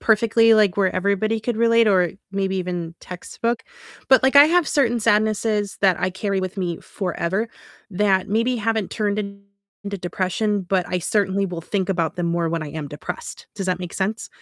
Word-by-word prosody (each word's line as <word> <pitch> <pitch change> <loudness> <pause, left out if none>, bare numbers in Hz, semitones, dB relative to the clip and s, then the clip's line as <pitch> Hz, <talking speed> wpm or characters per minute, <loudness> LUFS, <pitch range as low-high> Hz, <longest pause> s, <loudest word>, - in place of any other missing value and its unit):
perfectly, 225 +1 +4
like 210 -4 +3
where 190 -2 +1
everybody 200 +4 0
could 235 +1 -2
relate 230 0 +4
or 185 -4 +3 0.2
maybe 195 -1 -1
even 175 -2 -4
textbook, 230 +6 -4 0.5
but, 265 - +6
like, 265 +1 +3
I 285 - +11
have 345 0 +3
certain 240 -5 +2
sadnesses 210 -1 +1
that 190 -2 +4
I 185 - 0
carry 195 +1 -2
with 185 +1 -5
me 175 -3 -2
forever 190 +3 -3 0.4
that 190 -1 +1
maybe 230 +4 +1
haven't 220 -3 -1
turned 210 -1 -1
into 200 0 -8
depression, 190 +3 -1
but 185 0 0
I 180 - -1
certainly 195 +1 0
will 175 -3 -5
think 190 +2 -2
about 170 -4 -1
them 175 -1 -1
more 170 0 0
when 165 -1 -2
I 145 - -7
am 155 -2 -6
depressed, 150 +5 -7
does 195 -2 -4
that 180 -1 0
make 180 -1 -7
sense? 210 +3 -2
200 Hz, 185 wpm, -22 LUFS, 180-215 Hz, 0.5 s, I